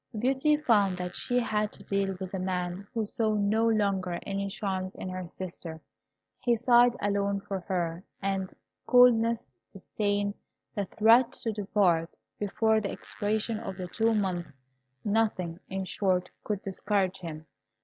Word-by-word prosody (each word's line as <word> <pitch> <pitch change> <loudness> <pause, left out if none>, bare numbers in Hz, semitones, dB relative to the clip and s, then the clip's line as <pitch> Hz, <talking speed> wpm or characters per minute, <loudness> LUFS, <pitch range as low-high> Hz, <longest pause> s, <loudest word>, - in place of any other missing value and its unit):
Beauty 270 +6 +3
found 205 -10 +3
that 180 0 -4
she 245 - -1
had 215 -3 +1
to - - -12
deal 195 -1 -1
with 190 -1 -6
a 190 - -2
man 180 +1 -2
who 225 -3 -1
saw 215 +1 0
no 210 +2 +2
longer 195 -5 +1
any 200 0 -2
charms 190 -2 -3
in 185 - -5
her 185 -1 -5
sister. 170 -2 -7 0.6
He 240 -1 +2
sighed 240 +1 +5
alone 200 0 0
for 195 -1 -4
her, 175 -1 -2 0.2
and 195 -1 -2 0.4
coldness, 235 -2 +5 0.3
disdain, 205 +1 -1 0.4
the 205 - -1
threat 230 +5 +5
to 225 - -3
depart 190 -5 +2 0.3
before 220 +2 +2
the 200 - -2
expiration 215 +2 -2
of 190 -4 -6
the 180 -2 -5
two 225 +2 +2
months 185 -4 -1 0.6
nothing, 205 -6 0
in 190 0 -3
short, 185 -1 0
could 205 -2 -3
discourage 195 -1 0
him. 160 -3 -7
200 Hz, 150 wpm, -29 LUFS, 185-220 Hz, 0.6 s, sighed